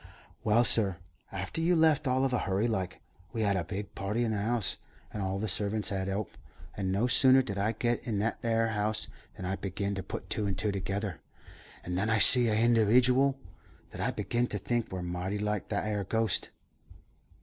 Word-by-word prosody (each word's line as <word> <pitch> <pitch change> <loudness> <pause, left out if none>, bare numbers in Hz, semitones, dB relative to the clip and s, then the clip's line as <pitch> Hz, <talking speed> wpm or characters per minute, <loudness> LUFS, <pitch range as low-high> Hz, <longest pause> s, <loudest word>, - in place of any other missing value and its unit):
"Well, 110 +3 +4
sur, 100 -6 +3 0.3
after 95 - -4
you 175 +2 +3
left 160 -3 +3
all 130 +1 +2
of 130 - -1
a 125 - +2
hurry 95 +3 0
like, 95 -5 -3 0.3
we 115 -2 -1
had 100 -2 +2
a 90 - 0
big 100 +3 -6
party 105 +5 -2
in 115 - 0
the 105 -2 -1
house, 115 -1 0 0.4
and 105 - -4
all 95 0 -2
the 110 +2 -2
servants 105 +2 +1
'ad 95 -1 -2
to 95 - -1
'elp; 105 +1 -4 0.4
and 95 -2 -2
no 100 +5 +1
sooner 130 +1 +5
did 100 -5 -4
I 105 +3 +1
git 120 +1 -1
in 110 -4 -2
that 110 +3 -1
'ere 115 -1 +1
house 110 0 -1 0.3
than 95 - -6
I 95 +1 -2
beginned 100 +1 -3
to - - -2
put - - -7
two 105 - -2
and 95 -2 -2
two 105 +2 0
together, 100 -1 -3 0.6
and 90 +1 -3
then 105 +3 0
I 110 - +3
see 120 +3 +7
a 110 - +1
hindiwidual 120 +4 +4 0.6
that - - -7
I - - +1
beginned 120 +1 -1
to 105 - -3
think 120 +4 -2
wur 95 -1 -4
mighty 90 +3 -3
like 105 -1 -2
that - - -1
'ere 105 -2 -1
ghost." 110 +3 -1
105 Hz, 210 wpm, -30 LUFS, 95-120 Hz, 0.6 s, see